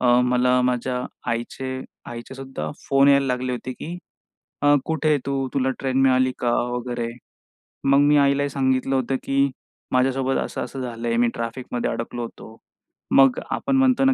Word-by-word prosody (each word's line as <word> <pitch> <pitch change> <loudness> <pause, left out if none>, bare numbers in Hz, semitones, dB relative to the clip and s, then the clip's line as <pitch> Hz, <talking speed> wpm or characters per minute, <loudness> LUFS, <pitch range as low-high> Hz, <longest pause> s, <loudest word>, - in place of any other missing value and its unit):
अ, 125 - +1 0.2
मला 125 0 +3
माझ्या 125 0 -1 0.3
आईचे 120 +3 -3 0.4
आईचे 120 +2 -8
सुद्धा 135 - -5 0.2
फोन 135 0 +5
यायला 140 -1 +5
लागले 125 0 -1
होते, 125 +1 -4
की 170 +7 -7 0.6
अ, 145 0 +5
"कुठे 155 -1 +1
तू? 135 -1 -1
तुला 130 -1 +1
ट्रेन 130 -1 -1
मिळाली 130 0 +4
का 120 - +1 0.2
वगैरे?" 120 -1 -3 0.8
मग 140 +1 +6
मी 145 +1 +5
आईलाही 140 0 +3
सांगितलं 130 -1 +1
होतं, 130 0 0
की 140 0 +2 0.4
"माझ्यासोबत 130 +1 +2
असं-असं 135 - -5
झालंय, 115 -1 -3
मी 120 - +4
ट्रॅफिकमध्ये 120 +1 -3
अडकलो 120 +1 -4
होतो." 110 -1 -10 0.6
मग 135 -2 +6
आपण 270 - 0
म्हणतो 265 0 +4
ना, 270 - +5
130 Hz, 155 wpm, -23 LUFS, 125-140 Hz, 0.8 s, मग